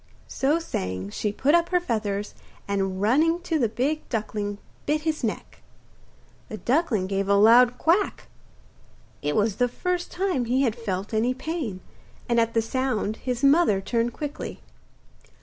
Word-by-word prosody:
So 285 +4 +1
saying 95 - -4
she 210 - -2
put 270 +8 +1
up 340 0 +3
her 360 - +3
feathers, 210 - -2 0.3
and 195 -2 -1
running 315 +10 +3
to 330 -2 -1
the 235 -5 +2
big 275 +8 -2
duckling 210 -3 -3 0.3
bit 305 +1 +1
his 310 -3 -2
neck. 220 - -4 0.9
The 215 - -5
duckling 245 - +1
gave 195 +1 -1
a 200 - +5
loud 240 +4 +6
quack; 365 +5 +1 0.9
it 150 0 -1
was 210 -1 +1
the 245 - +3
first 360 +7 -2
time 360 -9 0
he 255 +4 +2
had 230 -4 +1
felt 205 -3 -4
any 235 +4 +1
pain, 265 - -4 0.5
and 235 -1 +2
at 230 0 +1
the 225 - +3
sound 225 -3 -1
his 250 0 -3
mother 280 - +5
turned 230 +4 -1
quickly. 290 +4 -6
240 Hz, 155 wpm, -25 LUFS, 210-300 Hz, 0.9 s, loud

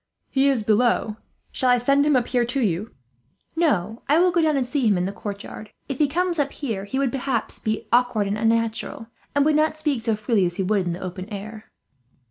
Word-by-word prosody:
"He 275 0 +3
is 255 -6 +1
below. 220 0 +2 0.3
Shall 255 - 0
I 245 - +5
send 275 +4 +3
him 295 - +4
up 245 -2 +2
here 245 -1 +1
to 250 +3 -1
you?" 205 -2 0 0.7
"No, 225 - 0
I 295 - +5
will 360 +1 +4
go 340 0 +2
down 310 -3 +2
and 260 - +1
see 255 -1 0
him 205 -3 +3
in 180 - 0
the 195 - -2
courtyard. 205 +1 -7 0.2
If 275 -2 -5
he 300 - +4
comes 345 +3 -1
up 280 -1 +1
here 220 -9 -4
he 235 +6 -4
would 270 -2 +1
be, 270 - -3
perhaps, 245 -3 -2 0.3
awkward 240 -4 +3
and 200 +1 -1
unnatural, 225 +2 -1 0.3
and 285 0 +3
would 310 - +3
not 310 0 +2
speak 300 -6 -1
so 225 -1 0
freely 210 -3 +1
as 175 - -5
he 190 - -1
would 195 -1 +1
in 170 - -1
the 175 - -7
open 185 +2 -6
air." 215 +1 -8
240 Hz, 230 wpm, -23 LUFS, 210-280 Hz, 0.7 s, I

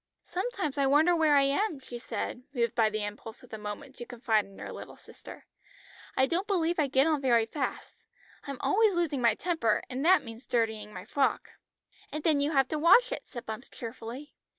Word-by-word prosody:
"Sometimes 370 - -3
I 275 - +3
wonder 310 +6 +5
where 315 -3 +4
I 280 - +6
am," 295 +4 0
she 245 -2 -8
said, 245 - -4
moved 235 -2 +1
by 225 -3 +3
the 215 0 -3
impulse 210 +3 -7
of 250 - -16
the 220 - -6
moment 210 +7 -7
to 240 - -7
confide 225 -4 +1
in 195 0 -16
her - - -7
little - - -9
sister. - - -13 0.7
"I 265 - +5
don't 345 +7 -1
believe 345 -4 +1
I 295 - +3
get 270 +1 +3
on 310 -3 +1
very 235 -4 +3
fast. 265 +4 -4 0.5
I'm 275 -1 -4
always 425 -1 +3
losing 320 -6 0
my 230 -3 +4
temper, 320 -12 0
and 260 +2 -3
that 370 +3 +5
means 230 +1 -10
dirtying 220 -3 -1
my 185 -2 -8
frock." 270 +4 0 0.6
"And 305 +1 -4
then 310 -3 +3
you 285 - +1
have 270 -3 +3
to 310 - -1
wash 360 +10 +6
it," - - -5
said 240 -2 -8
Bumps 220 +4 -7
cheerfully. 235 +4 -8
270 Hz, 205 wpm, -29 LUFS, 230-315 Hz, 0.7 s, I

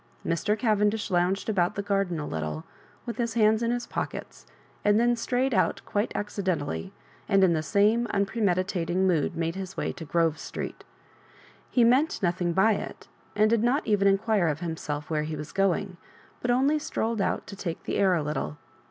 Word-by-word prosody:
Mr. 190 +6 0
Cavendish 210 -1 +1
louDged 180 +2 +1
about 180 -5 +1
the 200 - -2
garden 195 -4 0
a 150 - -4
little, 80 - -4 0.4
with 235 - -5
his 235 -2 -2
hands 220 0 +4
in 230 - +1
his 240 0 -1
pockets, - - -6 0.4
and 205 +1 +4
then 240 +1 +3
strayed 250 +3 0
out 190 - +2
quite 205 +2 -1
acd 205 -1 -3
dentaliy, 145 - -1 0.4
and 195 -1 +4
in 180 -2 +5
the 155 - 0
same 210 +7 +2
unpremeditating 190 -3 0
mood 170 -2 +1
made 165 0 -1
his 190 0 -7
way - - -1
to - - -9
Grove 160 0 +1
Street - - -6 0.9
He 245 - +3
meant 260 +7 +3
no 175 - +4
thing 175 -1 -2
by 190 +6 +4
it, 210 - -5 0.3
and 215 +1 +4
did 225 0 +2
not 250 +6 +1
even 205 -2 +3
inquire 200 -1 +2
of 150 -1 -1
himself 160 -3 -4
where 155 -1 +1
he 155 +1 -3
was 150 0 -7
going, 195 -1 0 0.4
but 245 - -2
only 275 +5 +3
strolled 225 -6 -2
out - - -1
to 200 - -9
take 170 -4 -5
the - - -1
aur 185 -2 +4
a 160 - 0
little. 75 - -3
195 Hz, 190 wpm, -27 LUFS, 170-220 Hz, 0.9 s, in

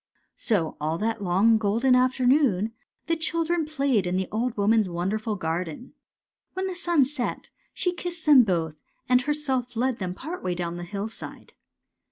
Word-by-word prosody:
" - - -51
So 180 -8 +1
all 155 +2 -1
that 225 +2 -2
long 200 +5 +4
golden 225 +5 +2
afternoon 250 -4 +3 0.3
the 330 - +1
chil 330 +1 0
dren 340 -1 0
played 275 -10 0
in 180 +1 0
the 190 -1 -1
old 230 +2 -1
woman's 210 0 +3
wonderful 210 +5 -2
garden. 175 - -4 0.6
When 375 +1 -2
the 380 - -2
sun 345 -5 +2
set 265 -2 -4 0.2
she 360 - -1
kissed 345 -2 -6
them 290 -4 +8
both 165 -6 -2 0.3
and 250 0 +4
herself 265 -4 -2
led 250 +1 0
them 180 -2 -3
part 325 - -6
way 180 -1 -1
down 175 -1 -3
the 175 - -6
hillside. 205 +4 -7
230 Hz, 170 wpm, -26 LUFS, 185-280 Hz, 0.6 s, them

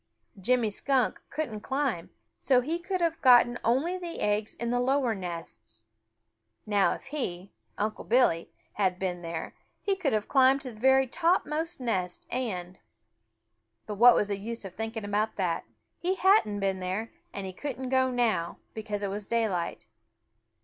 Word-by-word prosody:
Jimmy 235 +2 +2
Skunk 260 +3 0
couldn't 260 -9 -3
climb, 265 -4 0
and - - -23 0.3
so 255 -2 +3
he 320 +7 -2
could 370 +1 -3
have 335 -1 0
gotten 240 -2 +6
only 305 +10 +1
the 345 -2 -6
eggs 210 +1 0
in 235 0 -3
the 245 - +1
lower 260 -1 +2
nests. 165 - -7 0.8
Now 205 -2 +3
if - - -12
he, 195 -10 -4 0.3
Unc' 215 +1 -3
Billy, 230 -9 +3 0.2
had 190 -3 +1
been 180 -2 -3
there, 165 -1 -5 0.3
he 395 - +1
could 335 -8 0
have 215 -2 0
climbed 265 0 +4
to 260 -2 -6
the 215 - -14
very 265 +2 +5
topmost 330 +2 0
nest 185 -8 -2
and 185 -8 -3 1.1
but 210 - -5
what 240 +4 +7
was 205 - +2
the 200 -1 -2
use 230 +1 -5
of 190 - -7
thinking 225 +1 -4
about 210 +2 0
it? 180 -4 0 0.4
He 370 +2 0
hadn't 375 - +3
been 195 -1 0
there, 190 +5 -3 0.2
and 200 - -5
he 190 - -6
couldn't 260 +2 -5
go 260 0 +3
now, 225 -9 0 0.2
because 210 -2 -4
it 200 - -1
was 205 0 -5
daylight. 210 - -1
225 Hz, 165 wpm, -28 LUFS, 195-265 Hz, 1.1 s, what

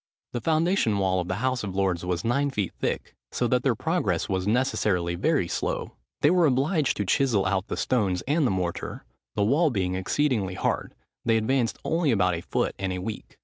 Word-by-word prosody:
The 120 - -3
foundation 160 - +2
wall 95 -1 +1
of 90 - -3
the 95 - -1
House 130 -3 0
of 95 -2 -5
Lords 95 -3 0
was 90 +3 -2
nine 140 +5 +2
feet 105 -9 -2
thick, - - -2 0.2
so - - 0
that - - +2
their - - +2
progress - - 0
was 95 0 -1
necessarily 105 -7 +1
very 100 - +1
slow. - - -2 0.3
They 150 - +5
were 175 -3 +4
obliged 145 +3 +1
to 105 - -1
chisel 115 -3 +2
out 95 +2 0
the - - -4
stones 100 -8 0
and 150 0 +2
the - - +1
mortar; 90 -3 -3 0.3
the 105 - +2
wall 145 +10 +3
being 95 -7 -1
exceedingly 95 0 0
hard, - - -2 0.3
they 115 -1 +3
advanced 120 +1 +1
only 165 -2 +1
about 95 -6 +3
a 85 - -3
foot - - -1
in 95 -1 -1
a 90 - -2
week. 105 +4 -6
105 Hz, 200 wpm, -26 LUFS, 95-135 Hz, 0.3 s, They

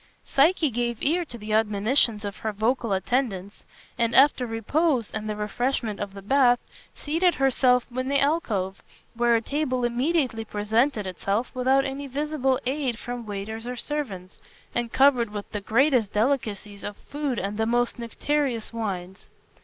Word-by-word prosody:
Psyche 310 +1 +3
gave 235 0 -1
ear 340 +5 +2
to 245 -7 -9
the 215 -1 -5
admonitions 215 +1 +2
of 200 -1 -5
her 220 - -3
vocal 225 +2 0
attendants, 200 -1 -1 0.3
and 230 0 +1
after 265 -2 +5
repose 240 +3 0
and 215 0 -4
the 210 - -2
refreshment 220 +1 -2
of 200 -1 -5
the 195 - -9
bath, 245 +2 +4 0.4
seated 335 +4 +1
herself 255 -2 +3
in 255 0 -1
the 280 +1 +2
alcove, 220 - 0 0.3
where 235 0 +3
a 225 - +2
table 255 -1 -1
immediately 245 -1 0
presented 220 +3 0
itself, 195 +5 -2
without 265 +1 +2
any 275 +1 -4
visible 275 -1 0
aid 260 -3 -1
from 245 -1 -6
waiters 215 +3 -5
or 250 - -3
servants, 230 -10 -5 0.3
and 240 -1 -2
covered 265 -4 +4
with 205 -1 -7
the 210 - -4
greatest 235 0 +2
delicacies 210 -4 -1
of 205 0 -6
food 285 -4 -3
and 200 +2 -3
the 220 - +1
most 240 +1 +1
nectareous 240 0 -1
wines. 190 -4 -5
240 Hz, 155 wpm, -25 LUFS, 210-270 Hz, 0.4 s, after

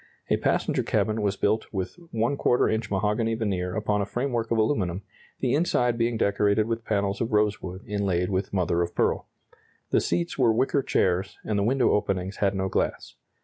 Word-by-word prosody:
A - - +4
passenger - - +1
cabin 110 0 0
was 100 -1 0
built 110 +3 +1
with 95 -3 -3 0.2
¼ 120 +2 +2
inch 110 -1 -2
mahogany 105 +3 0
veneer 95 -5 -2
upon 105 -1 0
a - - 0
framework 120 -1 -2
of 115 - +1
aluminum, 100 -5 0 0.4
the 125 - +1
inside 125 -6 +2
being 115 0 0
decorated 100 +1 +2
with 115 0 -3
panels 100 -3 -1
of 115 +1 -1
rosewood 100 -3 0
inlaid 100 -3 -1
with 95 +1 -1
mother 85 -3 +1
of 85 0 -3
pearl. - - +1 0.6
The - - +3
seats 170 -4 -1
were 120 -3 +5
wicker 130 +5 +2
chairs, 95 -5 0
and 105 -2 0
the - - +1
window 125 +3 +2
openings 95 -2 -1
had 100 -1 +1
no 95 0 0
glass. - - -2
105 Hz, 180 wpm, -26 LUFS, 95-115 Hz, 0.6 s, were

